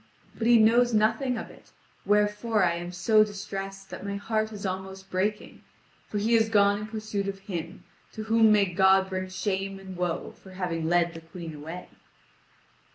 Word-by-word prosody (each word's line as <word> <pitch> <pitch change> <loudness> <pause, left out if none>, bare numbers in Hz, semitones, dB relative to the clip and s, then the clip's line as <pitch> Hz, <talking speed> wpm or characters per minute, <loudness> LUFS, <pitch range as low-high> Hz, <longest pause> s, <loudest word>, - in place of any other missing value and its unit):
But 230 - -1
he 240 0 +7
knows 235 +2 +4
nothing 240 +4 +2
of - - -7
it, - - -18 0.4
wherefore 210 +1 +2
I 170 -2 +3
am 175 +1 -5
so 215 +4 +4
distressed 195 -1 -6
that - - -7
my 200 0 -3
heart 215 +1 -1
is 205 -2 -7
almost 190 +1 -5
breaking, 205 +3 -2 0.5
for 210 - -4
he 220 +3 +1
is 220 -1 +4
gone 205 -1 +4
in 210 - -6
pursuit 215 -2 -4
of 195 0 -3
him, 180 -2 -6 0.3
to 220 - -5
whom 220 0 +4
may 210 -1 +5
God 190 +1 +3
bring 185 0 -3
shame 195 0 -2
and 190 -1 -9
woe 175 -1 -2
for 190 - -16
having 165 -3 -2
led 175 -1 +2
the 165 - -9
Queen 165 0 -9
away." 160 +4 -8
195 Hz, 180 wpm, -27 LUFS, 185-215 Hz, 0.5 s, he